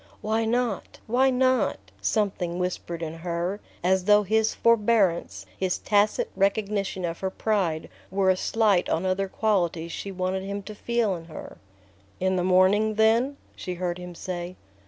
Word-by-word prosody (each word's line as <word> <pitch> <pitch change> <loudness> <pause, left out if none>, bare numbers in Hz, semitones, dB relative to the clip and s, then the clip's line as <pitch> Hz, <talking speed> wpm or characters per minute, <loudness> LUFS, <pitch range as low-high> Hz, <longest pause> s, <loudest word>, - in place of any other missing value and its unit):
"Why 220 +1 0
not... 235 -3 -1
why 255 +4 +3
not?" 255 -2 +2 0.2
something 180 - 0
whispered 175 -2 -3
in 160 0 -5
her, 175 +3 -2 0.2
as 185 0 +2
though 210 0 +6
his 220 +2 +1
forbearance, 205 - +2
his 185 - -1
tacit 210 0 +1
recognition 195 -1 0
of 165 -1 -4
her 190 - -1
pride, 190 -6 -1 0.2
were 190 0 +3
a - - +2
slight 205 -2 +2
on 165 +3 0
other 190 +1 0
qualities 175 -6 0
she 200 - -5
wanted 185 0 -2
him 200 +1 -5
to 215 - -8
feel 230 -1 0
in 165 -2 -7
her. 160 -2 -10 0.6
"In 190 0 +1
the 180 - 0
morning, 190 +4 +4
then?" 230 +6 +3 0.2
she 180 -2 -5
heard 175 0 -3
him 180 -1 -8
say. 180 0 -5
190 Hz, 155 wpm, -26 LUFS, 180-215 Hz, 0.6 s, though